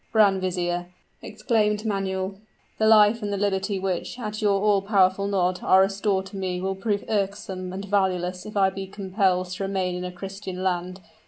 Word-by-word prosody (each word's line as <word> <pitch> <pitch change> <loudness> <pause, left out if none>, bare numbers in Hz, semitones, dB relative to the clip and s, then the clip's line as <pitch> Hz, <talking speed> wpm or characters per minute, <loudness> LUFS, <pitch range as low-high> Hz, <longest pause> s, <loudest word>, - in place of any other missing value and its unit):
"Grand 200 -4 +4
vizier," 175 -1 -1 0.3
exclaimed 215 0 0
Manuel, 190 -2 -2 0.5
"the 220 - +3
life 220 +1 +6
and 205 -1 -3
the 200 - -1
liberty 195 0 0
which, 190 +4 -3
at 215 -3 -5
your 200 -2 +3
all 205 -1 +3
powerful 195 -1 +2
nod 185 -2 +1
are 190 - +5
restored 195 0 +1
to 195 +1 -9
me 185 -1 -2
will 190 +1 -1
prove 200 +1 -2
irksome 195 -3 -2
and 195 +2 -5
valueless 185 -2 0
if 210 - -6
I 190 -1 +4
be 195 0 -6
compelled 190 -2 0
to 185 +1 -4
remain 190 -2 -1
in 180 0 -4
a 180 - -4
Christian 190 0 -7
land. 185 0 -2
195 Hz, 180 wpm, -25 LUFS, 185-205 Hz, 0.5 s, life